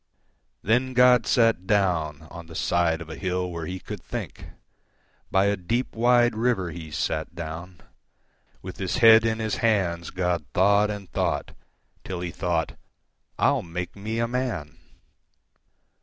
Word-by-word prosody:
Then 125 +5 +1
God 125 -2 +5
sat 115 -6 +2
downOn 85 -5 -1
the 80 - -11
side 85 -1 +1
of 85 - -9
a - - -6
hill 90 -1 -2
where 85 -2 -5
He 95 +1 -5
could - - -8
think; - - -6 0.8
By 95 +1 +3
a 100 0 +2
deep, 115 +8 -2
wide 120 +1 +4
river 110 -6 0
He 80 -1 -8
sat 75 - -3
down; 85 +2 -7 0.8
With 95 -1 -8
His 95 +3 -2
head 115 -2 +7
in 110 0 0
His 110 -1 -2
hands, 95 -8 0
God 90 -3 -1
thought 100 +2 +4
and 100 -2 -6
thought, - - -1 0.5
Till 90 -2 -5
He 90 -1 -4
thought, 85 -4 -2 0.6
"I'll - - +2
make 90 +1 -6
me 110 +3 -4
a 115 0 +1
man!" 115 - -3
95 Hz, 145 wpm, -25 LUFS, 85-115 Hz, 0.8 s, head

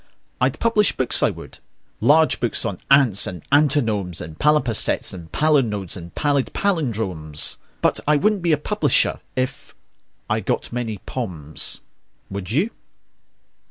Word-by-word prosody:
I'd - - +1
publish 220 -3 +2
books, 130 -2 +1
I - - +4
would - - -10 0.4
large 150 +8 +4
books 120 -1 -1
on 100 -5 -3
ants 135 -8 +5
and 90 -4 -7
antinomes 115 - +2
And 80 0 -9
palimpsests 145 -7 +1
and 85 -4 -10
palinodes 120 - +1
and 85 -2 -10
pallid 140 -3 +1
pallindromes: 110 - -1 0.3
But - - +2
I 150 - +5
wouldn't 205 +5 +2
be 170 -1 +1
a 155 - +4
publisher 150 - +1 0.2
if.... 130 +1 -3 0.5
I - - +1
got - - -2
many 115 -3 -3
"pomes." 85 - -4 0.5
Would 95 -2 -5
you? 165 - +1
120 Hz, 135 wpm, -22 LUFS, 95-150 Hz, 0.5 s, ants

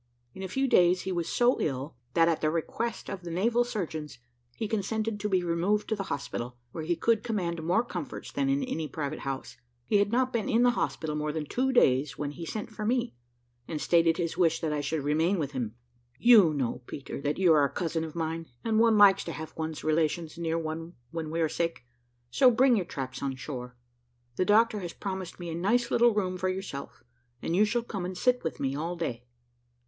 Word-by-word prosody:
In 190 - -9
a 190 - -3
few 270 +8 0
days 180 -5 +4
he 190 - -3
was 170 -2 -2
so 245 +1 +3
ill, 135 0 -2 0.2
that, 165 0 +5
at 165 -2 +1
the 155 - +2
request 190 +8 -3
of 195 - -5
the 175 - -7
naval 230 +8 +2
surgeons, 160 - -4 0.4
he 220 - -3
consented 220 0 -1
to 210 +1 -2
be 185 -2 +2
removed 175 +5 +1
to 220 - +1
the 195 -2 -4
hospital, 125 -3 -4
where 160 - -5
he 170 +2 0
could 225 +4 +2
command 180 -8 -2
more 180 +8 +2
comforts - - -6
than 275 -1 0
in 275 0 +1
any 160 -12 -3
private 145 +1 -4
house. 135 -1 -5 0.3
He 205 - +3
had 205 0 +2
not 255 +2 +1
been 235 +3 -1
in 235 -1 +4
the 245 - +5
hospital 160 -9 -2
more 150 0 -1
than 155 0 -3
two 260 - 0
days, 135 - +3
when 145 -1 -3
he 165 +2 -7
sent 215 +4 -5
for 215 0 -6
me, 240 +2 0 0.5
and 155 - -3
stated 165 +3 +3
his 170 -2 -2
wish 165 -2 +3
that 155 -2 -1
I 150 - -1
should 145 +1 -2
remain 160 +6 +2
with 145 -4 -2
him. 120 -5 -3 0.4
"You 220 -9 +7
know, 130 -4 -2
Peter, 135 0 -6
that 145 +1 -1
you 180 -4 +5
are 150 -2 +5
a 140 - +2
cousin 165 0 -2
of 160 0 -7
mine, 165 0 -3 0.2
and 220 -1 +2
one 225 -1 +5
likes 200 -2 +7
to 165 - -4
have 160 0 -7
one's 160 -1 -4
relations 155 +1 0
near 165 -1 -1
one 165 +1 -4 0.2
when 165 -2 -4
we 165 +1 -1
are 160 - +3
sick, 165 -4 -2 0.5
so 260 -2 +6
bring 250 +1 +4
your 195 -5 0
traps 130 -6 -5
on 135 -1 -2
shore. 125 -1 -7 0.6
The 185 - +1
doctor 215 +1 +4
has 175 -3 -6
promised 190 -3 -5
me 175 -1 -5
a - - -4
nice 235 +8 +1
little 240 0 +5
room 185 -3 0
for 185 +1 0
yourself, 185 -10 -6 0.4
and 165 - 0
you 205 +3 +5
shall 235 +3 0
come 200 -5 -5
and 180 0 -4
sit 250 0 +2
with 160 - -3
me 135 0 -1
all 165 +4 -3
day." 120 -8 -4
170 Hz, 225 wpm, -29 LUFS, 155-215 Hz, 0.6 s, You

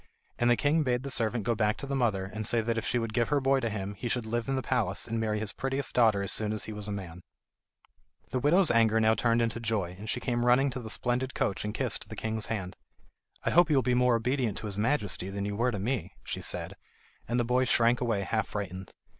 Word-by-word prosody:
And 120 - +3
the 120 - +5
king 150 +3 +2
bade 125 -3 0
the 140 - -4
servant 115 -2 0
go 120 +3 +1
back 105 -1 +1
to 140 - -6
the 140 0 -2
mother 110 -7 +1
and 110 -1 -1
say 120 - +2
that 115 +1 -1
if 115 - -2
she 120 - 0
would 115 -2 -2
give 120 +1 +2
her 145 - +3
boy 135 0 +2
to 120 -3 -1
him, 100 -2 -4
he 100 +4 -5
should 120 0 -1
live 120 +2 -2
in 135 - +1
the 130 - -2
palace 110 -7 -1
and 115 0 -2
marry 110 -1 0
his 110 -1 0
prettiest 135 +1 -2
daughter 110 -5 +4
as 100 - -3
soon 105 -1 -1
as 110 -1 -2
he 110 - -6
was 105 0 -6
a - - -3
man. 90 -4 -6 1.1
The 130 - 0
widow's 165 +7 +4
anger 115 -1 +4
now 110 0 +4
turned 115 0 +2
into 115 0 -2
joy, 105 -6 -2
and 110 +1 -7
she - - -1
came 120 -2 -1
running 130 +3 +4
to 130 - -5
the 110 -3 -7
splendid 125 +3 -1
coach 100 - -1
and 105 - -2
kissed - - 0
the - - -7
king's 110 -1 -2
hand. 95 -5 -4 0.7
"I - - 0
hope 175 0 +5
you 150 - +3
will 135 - +3
be 125 - +1
more 125 -1 +4
obedient 120 -2 0
to - - -6
his 100 -1 -2
Majesty 105 -6 0
than 100 0 -3
you 100 0 -3
were 120 +4 +1
to 110 - -2
me," 115 +4 -3
she - - -4
said; - - -2 0.5
and 120 +2 0
the - - +2
boy 125 +2 +2
shrank 120 0 +3
away 115 -5 0
half 110 +2 -1
frightened. 95 -2 -5
115 Hz, 265 wpm, -29 LUFS, 105-125 Hz, 1.1 s, the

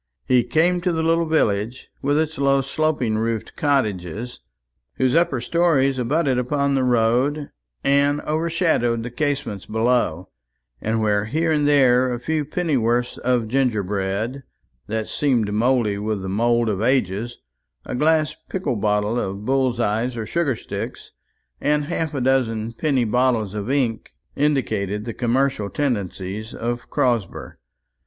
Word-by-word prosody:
He 125 -2 +4
came 175 +6 +2
to 180 0 +1
the 160 -1 -1
little 165 0 +2
village, 115 -6 0
with 145 +2 +1
its 155 -2 -1
low 140 0 +3
sloping 135 -6 0
roofed 115 -1 -2
cottages, 115 - -1 0.6
whose 130 -1 +1
upper 165 -5 +2
stories 140 -2 +2
abutted 135 +1 +1
upon 140 +3 0
the 135 -1 +2
road 125 +5 +1 0.3
and 140 +1 +3
overshadowed 155 -7 0
the 120 - -6
casements 140 -7 -2
below; 110 -6 0 0.5
and 110 +1 0
where 105 -1 +1
here 160 +8 0
and 150 -2 +2
there 130 -3 +4
a 120 - -3
few 155 +4 -1
pennyworths 125 -7 0
of 125 -3 +1
gingerbread, 110 -1 -1 0.5
that 110 0 -2
seemed 120 -8 0
mouldy 115 -2 +1
with 105 -2 -2
the 95 - -4
mould 115 +3 +2
of 105 -2 -1
ages, 120 -2 0 0.5
a - - -5
glass 155 +3 +2
pickle 150 - -2
bottle 105 +2 +1
of 100 0 -4
bull's 130 -2 +1
eyes 115 +2 0
or 110 - -3
sugar 155 -1 0
sticks, - - -7 0.5
and 150 0 +1
half 160 -1 -2
a 135 - -1
dozen 115 -4 +1
penny 135 -1 +1
bottles 115 -3 +1
of 105 +2 -4
ink, 130 -5 -1 0.2
indicated 110 -8 0
the 115 - -4
commercial 125 -3 0
tendencies 105 -5 -3
of 120 +1 -4
Crosber. 120 -7 -1
125 Hz, 140 wpm, -22 LUFS, 110-145 Hz, 0.6 s, He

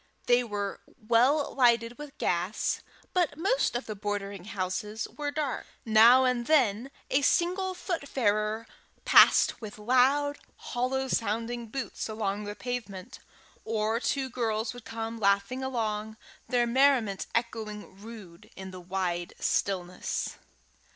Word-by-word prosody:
They 245 0 +4
were 205 -3 -4 0.2
well 245 +7 +2
lighted 235 -1 +3
with 295 -1 -9
gas, 180 +4 -1 0.3
but 345 -5 +1
most 395 - +1
of 240 - -2
the 215 - -4
bordering 200 -2 -4
houses 210 +2 -3
were 295 -1 -2
dark. 290 -2 -3 0.2
Now 230 +4 +7
and 245 -2 0
then 255 -5 +3 0.2
a 275 - +3
single 370 +5 +1
foot 345 -5 -4
farer 215 -2 0 0.4
passed - - +6
with 215 -2 -8
loud, 260 +6 +2 0.2
hollow 265 +2 -2
sounding 230 +1 -2
boots 260 0 -5
along 210 -1 -2
the 205 0 -5
pavement; 210 -7 -6 0.4
or 220 +1 0
two 265 +1 -1
girls 225 -2 -2
would 245 -2 -12
come 225 0 -5
laughing 200 +6 +1
along, 220 -4 -2 0.3
their 245 -1 +3
merriment 240 -5 +2
echoing 215 -4 -4
rude 210 -6 -11
in 190 0 -8
the 185 -1 -9
wide 175 -1 -3
stillness. 180 -2 -2
230 Hz, 130 wpm, -28 LUFS, 205-260 Hz, 0.4 s, Now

